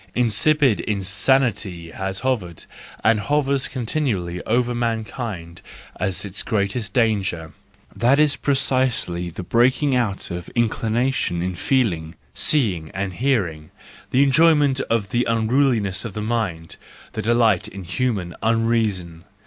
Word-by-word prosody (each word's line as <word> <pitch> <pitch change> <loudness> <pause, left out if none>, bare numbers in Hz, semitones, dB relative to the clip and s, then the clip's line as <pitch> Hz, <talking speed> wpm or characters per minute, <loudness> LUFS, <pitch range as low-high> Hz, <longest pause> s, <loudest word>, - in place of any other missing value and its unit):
Incipient 125 +2 +3
insanity 100 -3 0
has 95 +2 -4
hovered, 110 -11 -2 0.4
and 115 -1 +4
hovers 140 +3 +1
continually 115 - -2
over 120 +2 +1
mankind 110 -6 -4 0.4
as 95 0 -1
its 100 -1 -2
greatest 105 +1 -2
danger: 100 - 0 0.4
that 125 +4 +3
is 150 -1 +3
precisely 130 -11 0
the 85 - -7
breaking 130 - +2
out 110 -8 -2
of 90 0 -6
in¬ 120 -1 +3
clination 115 -6 -1
in 90 0 -2
feeling, 85 - 0 0.2
seeing, 95 - +2
and 95 -1 -3
hearing; 90 - -1 0.4
the 135 +2 +4
enjoy¬ 155 +4 +5
ment 140 -2 +2
of 115 -4 0
the 120 +1 +2
unruliness 115 -3 +1
of 115 -5 -6
the 105 - -4
mind; 105 -8 -3 0.4
the - - -3
delight 115 -4 +2
in 95 0 -9
human 95 -2 -2
unreason. 110 -7 0
110 Hz, 125 wpm, -22 LUFS, 95-125 Hz, 0.4 s, enjoy¬